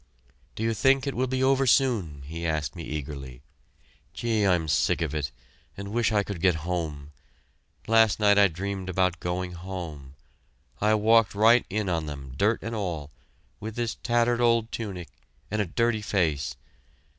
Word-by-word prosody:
"Do 110 - -4
you 115 0 +1
think 135 +4 +3
it 140 - -2
will 130 +2 0
be 130 +1 -1
over 135 0 +3
soon?" 105 - +2
he 85 +3 -6
asked 80 -1 -1
me 85 - -7
eagerly. 70 -5 -6 0.7
"Gee, 110 -4 +1
I'm 85 -4 +2
sick 75 - +2
of 80 -3 -2
it 70 -4 -2 0.5
and 100 0 -6
wish 115 +1 +1
I 105 -2 +2
could 100 -5 -6
get 90 -2 +4
home. 75 -5 -3 0.7
Last 115 -2 +4
night 105 -1 +5
I 100 - +7
dreamed 95 +2 -5
about 90 -1 +1
going 90 +1 -3
home. 85 -6 -7 0.7
I 105 +1 +4
walked 110 0 +4
right 115 +4 +5
in 105 +1 -1
on 80 -3 -1
them 70 -3 -7
dirt 105 +9 +1
and 115 - -4
all 85 -9 -4 0.5
with 110 +1 -6
this 120 -1 -1
tattered 120 0 +1
old 115 -1 +2
tunic 95 -6 -5 0.4
and 110 0 +1
a 105 - -2
dirty 115 +4 0
face. 80 -9 0
100 Hz, 170 wpm, -26 LUFS, 80-115 Hz, 0.7 s, I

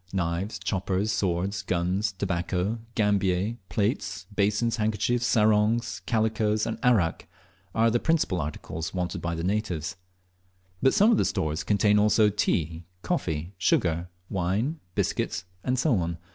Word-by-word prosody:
Knives, 90 +2 -2
choppers, 95 +2 -1
swords, 95 +2 -1
guns, 95 +4 0
tobacco, 95 +3 -1 0.2
gambier, 100 0 +1
plates, 100 -2 -1
basins, 105 +3 +1
handkerchiefs, 115 +3 +1
sarongs, 110 +1 +2
calicoes, 110 -1 +1
and 115 - -3
arrack, 105 -10 +2 0.5
are 115 +1 +4
the 120 - +2
principal 160 - +1
articles 80 +3 -5
wanted 90 -1 -2
by 85 -1 -2
the 80 - -4
natives; 95 -5 -2 0.8
but 135 - +4
some 215 +2 +6
of 225 - +4
the - - +3
stores 80 0 -1
contain 105 0 +3
also 105 +1 +4
tea, 85 -5 -1 0.2
coffee, 85 - -2
sugar, 85 -1 +1 0.2
wine, 100 - -1 0.2
biscuits, - - -1 0.3
&c. 130 -1 +2
100 Hz, 125 wpm, -27 LUFS, 90-110 Hz, 0.8 s, some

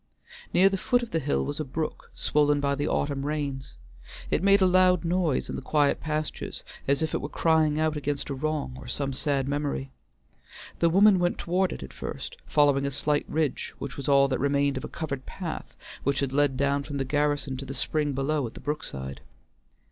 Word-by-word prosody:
Near 190 +2 +6
the 195 0 +1
foot 245 -1 +2
of 235 - -7
the 165 - +1
hill 145 -1 0
was 145 +2 -4
a - - 0
brook, 155 +3 -4
swollen 145 -1 +2
by 140 0 +1
the 145 +2 -1
autumn 140 -1 0
rains; 140 - -3 0.6
it - - +2
made 200 +1 +5
a 190 - +5
loud 185 -2 +4
noise 170 -4 +1
in - - -4
the - - -4
quiet 145 -2 +2
pasture, 155 -1 -3 0.4
as 140 +3 +2
if 160 - -2
it - - 0
were 145 - -4
crying 155 -2 +2
out 155 -1 +1
against 145 0 -2
a - - 0
wrong 145 -1 -2
or 130 - -10
some 135 +2 -2
sad 135 0 0
memory. 140 -1 -2 0.9
The 170 - +4
woman 195 +2 +6
went 175 0 +1
toward 185 +2 +1
it - - -6
at 65 - -10
first, - - -6
following 140 -2 +3
a - - 0
slight 145 +2 0
ridge 155 -4 -1
which 140 - -6
was 140 0 -4
all 140 0 +6
that 130 - 0
remained 140 +1 +2
of 130 - -4
a - - -4
covered 140 -5 -5
path 175 -5 -6 0.3
which 140 +1 +1
had 135 -1 -1
led 140 -2 +2
down 140 +1 +1
from 140 0 -5
the 135 - -1
garrison 145 0 0
to 135 - -6
the 135 +1 -6
spring 150 -1 0
below 135 0 0
at 115 - -11
the - - -8
brookside. 70 - -4
145 Hz, 210 wpm, -27 LUFS, 140-155 Hz, 0.9 s, Near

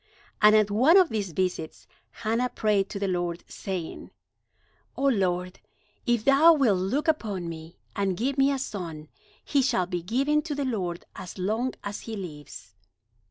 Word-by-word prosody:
And 210 0 +7
at 210 -1 +3
one 260 - +5
of 370 -4 +5
these 205 -5 -2
visits 180 -2 -3 0.2
Hannah 230 +3 -1
prayed 210 -4 +1
to - - -5
the 200 0 -1
Lord, 175 -2 -2
saying: 185 -4 -6 0.9
"O - - -3
Lord, 185 -8 +1 0.5
if 240 -2 +1
thou 290 +5 +7
wilt 230 -10 +3
look 260 - -1
upon 210 - -1
me, 165 0 -8 0.2
and 195 -3 0
give 265 +5 -1
me 275 0 +3
a 275 - 0
son, 170 - -6 0.4
he 280 - +2
shall 190 -8 +1
be 175 -1 -3
given 270 - +1
to 300 -1 -4
the 285 -1 -2
Lord 185 -9 -3
as 185 0 -8
long 220 +7 -1
as 205 0 -5
he 225 - -7
lives." 150 - -9
205 Hz, 165 wpm, -26 LUFS, 180-260 Hz, 0.9 s, And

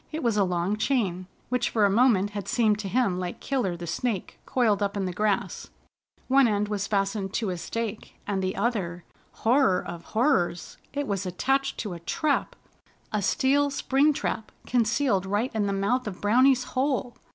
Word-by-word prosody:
It 315 -1 -4
was 230 -3 +2
a 205 - +3
long 180 +2 0
chain, 200 -7 0 0.2
which 250 0 0
for 215 -3 +3
a - - +4
moment 205 -3 +3
had 205 -2 -5
seemed 220 -5 +2
to 205 - -4
him 195 -4 +1
like 180 -1 -4
Killer 240 -11 -1
the 170 - -6
Snake 200 +4 -3
coiled 220 -5 +2
up 200 0 -1
in 195 - -1
the 180 - -3
grass. 205 +1 -1 0.6
One 270 -1 +5
end 210 -1 0
was 200 -2 -2
fastened 195 -1 -1
to 215 -5 0
a 180 - -3
stake, 225 +2 -5
and 195 -2 -1
the 185 0 -2
other 180 -7 -2 0.4
Horror 230 -5 +4
of 170 -1 -7
Horrors! 215 -8 0
It 285 0 -2
was 200 -4 -2
attached 270 +9 0
to 210 -5 -4
a 170 - -7
trap, 285 - -1 0.6
a 210 - +1
steel 280 +8 +2
spring 280 +1 +2
trap, 220 -6 -3
concealed 235 -4 +1
right 205 +6 0
in 210 -2 0
the - - 0
mouth 210 +6 0
of 190 -3 -6
Browny's 255 +5 +4
hole. 260 -3 -1
210 Hz, 185 wpm, -26 LUFS, 195-255 Hz, 0.6 s, One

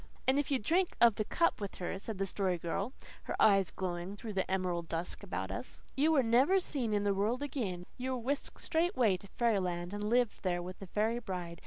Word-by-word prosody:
"And 265 +2 +4
if 290 - -1
you 275 - +3
drank 340 - +1
of 235 -2 +7
the 215 - -1
cup 335 -4 +1
with 200 - -4
her," 185 +1 -4
said 215 0 -5
the 195 - 0
Story 190 -2 0
Girl, 175 +7 -2 0.3
her - - -4
eyes 195 -3 +5
glowing 180 +1 -4
through 215 0 -6
the 190 -1 -1
emerald 180 -3 -1
dusk 165 +2 -3
about - - -4
us, - - -7
"you 300 +4 +3
were 285 -5 +4
never 260 +12 +4
seen 265 -10 -2
in 205 -1 +1
the 200 -1 +2
world 220 +7 0
again; 210 -11 -3
you 260 +1 -1
were - - -1
whisked 265 +4 -2
straightway 320 - +2
to 200 - -12
fairyland, 185 -6 +1
and 205 0 -3
lived 235 +1 +2
there 180 -2 0
with 185 +2 -8
a 195 - -7
fairy 220 +5 0
bride. 180 -6 -5
205 Hz, 220 wpm, -33 LUFS, 185-250 Hz, 0.3 s, of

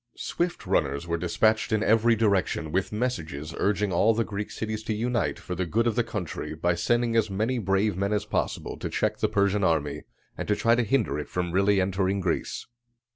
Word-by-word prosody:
Swift 175 -7 -2
runners 70 -5 0
were 85 -1 -1
dispatched 110 +7 +1
in 110 0 +2
every 115 +1 +4
direction 100 -7 +1
with 95 +3 0
messages 85 - -3
urging 100 -1 +1
all 110 +6 +4
the 115 - +2
Greek 105 -1 -5
cities 110 -1 -4
to 110 0 -2
unite 120 0 0
for 90 - -6
the 90 +1 -1
good 115 +8 +1
of 120 - +2
the 120 - +2
country 90 -8 -5
by 85 +3 +1
sending 120 +6 +1
as 110 -2 +3
many 110 +6 0
brave 100 0 +1
men 100 +2 -1
as 105 0 0
possible - - -2
to - - -4
check - - -1
the - - +1
Persian 100 0 +2
army, 75 -5 +1 0.3
and - - -5
to 105 - +2
try 115 +2 +3
to 120 - +3
hinder 110 - +1
it 75 - -6
from 90 -1 -2
really 100 +2 +3
entering 95 +1 0
Greece. 90 -3 -2
100 Hz, 205 wpm, -26 LUFS, 90-110 Hz, 0.3 s, every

